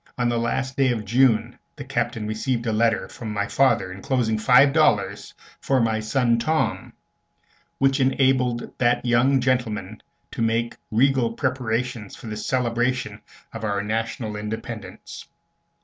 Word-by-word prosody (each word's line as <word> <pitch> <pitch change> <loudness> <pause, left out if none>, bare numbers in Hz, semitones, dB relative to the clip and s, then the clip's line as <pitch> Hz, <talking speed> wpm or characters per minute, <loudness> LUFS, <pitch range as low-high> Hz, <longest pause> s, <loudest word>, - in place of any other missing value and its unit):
On 120 -1 +1
the 120 -1 0
last 130 +3 -2
day 135 -2 +3
of 110 -3 -3
June 120 +1 +2 0.2
the 145 - -7
Captain 120 -4 -2
received 115 +3 -2
a 110 - 0
letter 115 +1 +1
from 110 -3 -7
my 100 -1 -1
father, 115 -9 +2
enclosing 110 +2 -1
five 130 +4 +5
dollars 115 -10 +1 0.2
"for 135 -1 +1
my 110 -2 +1
son 115 +1 +1
Tom," 155 +6 -1 0.8
which 135 +1 +2
enabled 130 -2 +1
that 120 0 +2
young 125 +3 +3
gentleman 110 -6 -1 0.3
to - - -5
make 115 +1 0
regal 125 0 +2
preparations 120 -3 -2
for - - -13
the 110 -1 -5
celebration 125 +2 -1 0.3
of 115 - -7
our 100 -1 -1
national 110 0 -3
independence. 105 +1 -7
120 Hz, 140 wpm, -23 LUFS, 110-130 Hz, 0.8 s, five